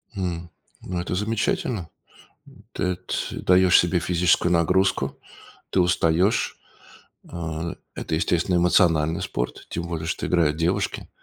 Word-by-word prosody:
М, 85 Hz, -3 st, -3 dB, 0.3 s
ну 90 Hz, -1 st, -4 dB
это 90 Hz, -, -3 dB
замечательно, 105 Hz, -2 st, -1 dB, 0.8 s
ты 90 Hz, -1 st, -1 dB
т -, -, -4 dB
даешь 90 Hz, 0 st, +5 dB
себе 85 Hz, +1 st, +2 dB
физическую 90 Hz, 0 st, +2 dB
нагрузку, 90 Hz, +3 st, +1 dB, 0.5 s
ты -, -, +1 dB
устаешь, 90 Hz, +3 st, +2 dB, 0.7 s
а, 85 Hz, -1 st, -4 dB, 0.2 s
это -, -, -2 dB
естественно 85 Hz, +2 st, +1 dB
эмоциональный 85 Hz, -2 st, +3 dB
спорт, -, -, -4 dB
тем 85 Hz, -, -4 dB
более 80 Hz, -2 st, -4 dB
что -, -, -2 dB
играют 80 Hz, -4 st, +2 dB
девушки, 85 Hz, +2 st, -1 dB
85 Hz, 120 wpm, -24 LUFS, 85-90 Hz, 0.8 s, даешь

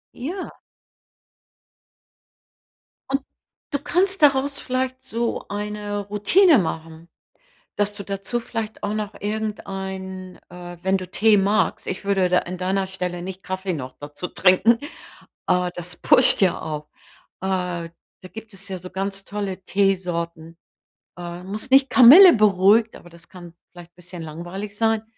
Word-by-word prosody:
Ja. 340 Hz, +10 st, -6 dB, 2.5 s
Und, 270 Hz, +1 st, 0 dB, 0.5 s
du 285 Hz, -, -1 dB
kannst 375 Hz, +5 st, 0 dB
daraus 280 Hz, -1 st, +3 dB
vielleicht 255 Hz, 0 st, -3 dB
so 235 Hz, -2 st, -3 dB
eine 205 Hz, 0 st, -4 dB
Routine 275 Hz, -, +4 dB
machen, 165 Hz, -2 st, -5 dB, 0.7 s
dass 205 Hz, 0 st, -1 dB
du 200 Hz, -, -6 dB
dazu 200 Hz, +4 st, -3 dB
vielleicht 225 Hz, -2 st, -6 dB
auch 205 Hz, -, -1 dB
noch 215 Hz, -1 st, -4 dB
irgendein, 190 Hz, -3 st, -5 dB
äh 175 Hz, 0 st, -10 dB
wenn 190 Hz, +1 st, +1 dB
du 185 Hz, -1 st, -7 dB
Tee 210 Hz, +2 st, +4 dB
magst, 200 Hz, +2 st, 0 dB
ich 190 Hz, -, -5 dB
würde 195 Hz, -2 st, +1 dB
da 180 Hz, 0 st, +4 dB
an 180 Hz, +1 st, -7 dB
deiner 190 Hz, +1 st, -1 dB
Stelle 180 Hz, -2 st, -4 dB
nicht 190 Hz, +1 st, -8 dB
Kaffee 185 Hz, -1 st, -3 dB
noch 130 Hz, -4 st, -7 dB
dazu 145 Hz, +4 st, -7 dB
trinken, 190 Hz, +7 st, +3 dB, 0.7 s
äh, 180 Hz, -1 st, +1 dB
das 175 Hz, 0 st, -5 dB
pusht -, -, +5 dB
ja 185 Hz, -3 st, +2 dB
auch. 150 Hz, -1 st, -5 dB, 0.5 s
Äh, 180 Hz, -3 st, -2 dB, 0.3 s
da 185 Hz, -, -12 dB
gibt 225 Hz, -1 st, -10 dB
es 195 Hz, +1 st, -8 dB
ja 190 Hz, -, -4 dB
so 180 Hz, +1 st, -10 dB
ganz 195 Hz, +1 st, -4 dB
tolle 200 Hz, -2 st, -5 dB
Teesorten. 170 Hz, -4 st, -1 dB, 0.6 s
Äh, 175 Hz, 0 st, -7 dB
muss 205 Hz, +6 st, -5 dB
nicht 270 Hz, 0 st, +5 dB
Kamille 290 Hz, +10 st, +9 dB
beruhigt, 210 Hz, +1 st, +3 dB
aber 175 Hz, -, -15 dB
das 170 Hz, 0 st, -17 dB
kann 175 Hz, -2 st, -13 dB, 0.2 s
vielleicht 175 Hz, -1 st, -14 dB
bisschen 180 Hz, -1 st, -10 dB
langweilig 175 Hz, +6 st, -7 dB
sein. 225 Hz, -1 st, +1 dB
195 Hz, 140 wpm, -22 LUFS, 180-215 Hz, 2.5 s, Kamille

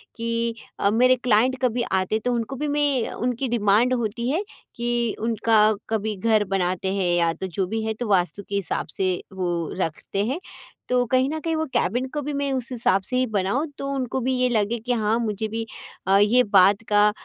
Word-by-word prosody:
कि 230 Hz, 0 st, -1 dB, 0.2 s
अ, 200 Hz, -, +3 dB
मेरे 250 Hz, +4 st, +4 dB
क्लाइंट 250 Hz, +2 st, +3 dB
कभी 245 Hz, -1 st, +1 dB
आते, 190 Hz, +3 st, +1 dB
तो 245 Hz, +3 st, -1 dB
उनको 235 Hz, +3 st, -2 dB
भी 295 Hz, +3 st, -3 dB
मैं 285 Hz, -4 st, +1 dB
उनकी 250 Hz, +2 st, -2 dB
डिमांड 230 Hz, +2 st, +3 dB
होती 235 Hz, 0 st, -2 dB
है 330 Hz, +9 st, 0 dB, 0.3 s
कि 235 Hz, -1 st, -1 dB
उनका 225 Hz, 0 st, +1 dB, 0.3 s
कभी 220 Hz, -1 st, -1 dB
घर 215 Hz, +1 st, +2 dB
बनाते 185 Hz, +1 st, -1 dB
हैं, 180 Hz, -3 st, +1 dB
या 170 Hz, -1 st, +2 dB
तो 190 Hz, -, -5 dB
जो 185 Hz, +2 st, -2 dB
भी 220 Hz, +3 st, -2 dB
है, 220 Hz, -, -1 dB
तो 235 Hz, +2 st, -5 dB
वास्तु 195 Hz, +1 st, +1 dB
के 200 Hz, -, -2 dB
हिसाब 195 Hz, -4 st, -2 dB
से 185 Hz, -1 st, +1 dB, 0.2 s
वो 175 Hz, -3 st, -2 dB
रखते 185 Hz, +4 st, -2 dB
हैं। 265 Hz, +9 st, -2 dB, 0.5 s
तो 250 Hz, 0 st, +2 dB
कहीं 260 Hz, +1 st, +3 dB
न 315 Hz, +1 st, -3 dB
कहीं, 325 Hz, +1 st, -2 dB
वो 315 Hz, 0 st, 0 dB
कैबिन 245 Hz, +8 st, 0 dB
को 295 Hz, -, -2 dB
भी 295 Hz, +1 st, -4 dB
मैं 280 Hz, 0 st, -1 dB
उस 255 Hz, -1 st, -3 dB
हिसाब 225 Hz, -5 st, +2 dB
से 250 Hz, -, -4 dB
ही 255 Hz, -, +2 dB
बनाऊँ, 210 Hz, +7 st, 0 dB
तो 275 Hz, -, -4 dB
उनको 265 Hz, -1 st, -2 dB
भी 260 Hz, +2 st, 0 dB
ये 250 Hz, 0 st, +3 dB
लगे 225 Hz, 0 st, 0 dB
कि 250 Hz, -, +1 dB
हाँ, 220 Hz, -1 st, +1 dB
मुझे 220 Hz, -1 st, -2 dB
भी 225 Hz, +1 st, -4 dB, 0.4 s
अ, 195 Hz, +1 st, +5 dB
ये 225 Hz, +5 st, +5 dB
बात 200 Hz, 0 st, +4 dB
का 210 Hz, 0 st, +5 dB
225 Hz, 210 wpm, -24 LUFS, 200-250 Hz, 0.5 s, अ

